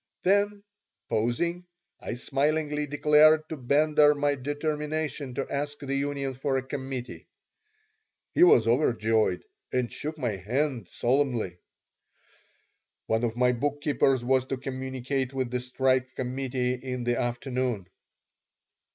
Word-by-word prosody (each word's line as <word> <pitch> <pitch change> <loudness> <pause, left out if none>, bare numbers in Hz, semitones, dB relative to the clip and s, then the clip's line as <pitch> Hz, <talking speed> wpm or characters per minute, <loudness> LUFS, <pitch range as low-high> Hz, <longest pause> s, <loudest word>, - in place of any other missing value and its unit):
Then, 200 +1 +2 0.5
pausing, 170 +11 -1 0.3
I - - -5
smilingly 150 +3 0
declared 150 +2 +5
to 160 - -3
Bender 150 +3 +4
my 145 0 +1
determination 150 0 -3
to 135 - -2
ask 145 +1 -3
the 140 -1 -4
union 140 -1 -2
for 135 +1 -1
a 130 - -2
committee. 130 -2 -6 1.1
He - - +1
was 120 - +7
overjoyed 115 -6 +2 0.3
and 125 -2 0
shook 155 +1 -5
my 120 -8 -2
hand 120 - -1
solemnly 120 -8 0 1.5
One 110 +1 0
of 115 0 -1
my 125 0 +4
bookkeepers 135 -1 +1
was 130 0 +3
to 135 0 -3
communicate 130 0 -3
with 130 -2 -1
the 125 - 0
strike 130 +1 0
committee 130 0 -2
in 125 -1 -4
the 120 0 0
afternoon. 120 -3 -2
135 Hz, 120 wpm, -27 LUFS, 125-145 Hz, 1.5 s, was